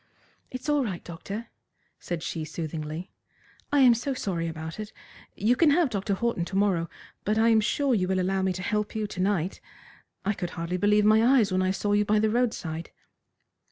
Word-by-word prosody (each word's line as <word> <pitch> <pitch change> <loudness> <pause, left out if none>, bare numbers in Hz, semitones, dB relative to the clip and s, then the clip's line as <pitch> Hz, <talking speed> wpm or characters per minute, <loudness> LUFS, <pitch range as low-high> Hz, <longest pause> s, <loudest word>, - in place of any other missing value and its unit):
"It's 255 +3 -7
all 295 -2 +2
right, 190 -7 -4
doctor," 195 +7 -7 0.5
said 170 -2 -4
she 165 -2 -3
soothingly. 155 +2 -5 0.6
"I 290 -1 +4
am 250 -2 +8
so 255 +4 -2
sorry 175 -8 -2
about 160 +2 -6
it. 215 0 -6 0.4
You 225 +5 +2
can 315 +4 +4
have 300 -2 +3
Dr. 200 0 -1
Horton 235 -4 -1
to 190 - -6
morrow, 190 -5 +1 0.3
but 210 +2 0
I 225 +1 +4
am 220 -1 +5
sure 270 +5 +1
you 185 -5 +1
will 190 0 +1
allow 190 +1 0
me 190 0 +1
to 185 +1 -6
help 210 +1 -1
you 215 -1 -1
to 195 -3 -5
night. 190 -2 0 0.6
I 205 - +2
could 180 -3 -4
hardly 170 +2 -2
believe 210 +2 +3
my 215 +1 +5
eyes 240 -5 +4
when 185 0 +2
I 185 - +1
saw 205 +2 -1
you 205 0 +4
by 210 +1 +2
the 215 0 +2
roadside." 180 -9 -1
205 Hz, 200 wpm, -27 LUFS, 180-225 Hz, 0.6 s, am